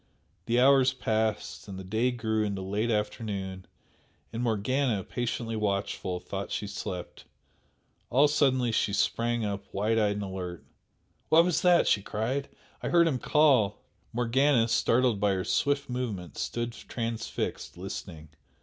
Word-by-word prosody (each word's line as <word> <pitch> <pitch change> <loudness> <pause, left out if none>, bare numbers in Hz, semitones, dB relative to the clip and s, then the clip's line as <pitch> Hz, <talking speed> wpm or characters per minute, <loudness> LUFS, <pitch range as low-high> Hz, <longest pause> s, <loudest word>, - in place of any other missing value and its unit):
The 120 +1 +2
hours 130 0 +5
passed 110 -5 -2
and 95 -2 -7
the 95 - -7
day 110 +6 +1
grew 110 -3 -1
into 100 -2 -3
late 105 +5 -1
afternoon, 100 -3 -3 0.7
and 115 - -3
Morgana, 120 0 0
patiently 115 0 -3
watchful, 100 -3 -2
thought 100 +2 -5
she - - -3
slept. 95 -3 -6 0.8
All 140 +4 +5
suddenly 130 -5 +2
she 105 -2 +1
sprang 115 +2 +1
up, 100 -1 -5
wide 110 +3 +1
eyed 105 -1 +2
and 105 0 -4
alert. 90 -3 -6 0.6
"What 165 +2 +6
was 180 -3 +1
that?" 175 -1 +5
she 100 - +3
cried 115 +8 -2 0.3
"I - - -2
heard 170 -1 +5
him 135 -6 0
call!" 135 -11 +3 0.3
Morgana, 120 +1 +3
startled 115 -1 +2
by 100 -1 +2
her 95 -1 -2
swift 140 0 +1
movement, 110 - -4
stood 120 0 -3
transfixed 115 -1 -4
listening. 80 -1 -7
115 Hz, 140 wpm, -28 LUFS, 100-125 Hz, 0.8 s, What